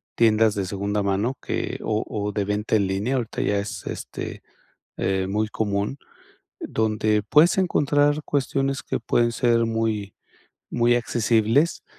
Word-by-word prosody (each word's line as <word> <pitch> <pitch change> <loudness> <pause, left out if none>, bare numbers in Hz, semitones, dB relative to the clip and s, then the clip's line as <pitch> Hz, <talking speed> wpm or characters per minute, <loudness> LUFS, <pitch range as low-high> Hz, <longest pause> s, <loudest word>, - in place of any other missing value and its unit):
tiendas 110 -1 +4
de 100 -2 -2
segunda 100 +2 -2
mano, 100 +6 0
que - - -3
o 110 0 0
o 105 -1 -3
de 105 -1 -1
venta 105 +2 0
en 100 -3 +2
línea, 100 +7 -1
ahorita 120 -4 -2
ya 100 - +1
es, 100 +1 -6
este, - - -6 0.5
eh, 95 0 0
muy 105 +2 0
común. 105 +4 -2 0.6
Donde 110 -1 0
puedes 150 - +4
encontrar 145 -5 +2
cuestiones 135 -1 -1
que - - -2
pueden 120 +1 +1
ser 115 -1 +2
muy 110 -3 -2 0.6
muy 120 0 +2
accesibles, 120 +5 +1
110 Hz, 140 wpm, -24 LUFS, 105-120 Hz, 0.6 s, tiendas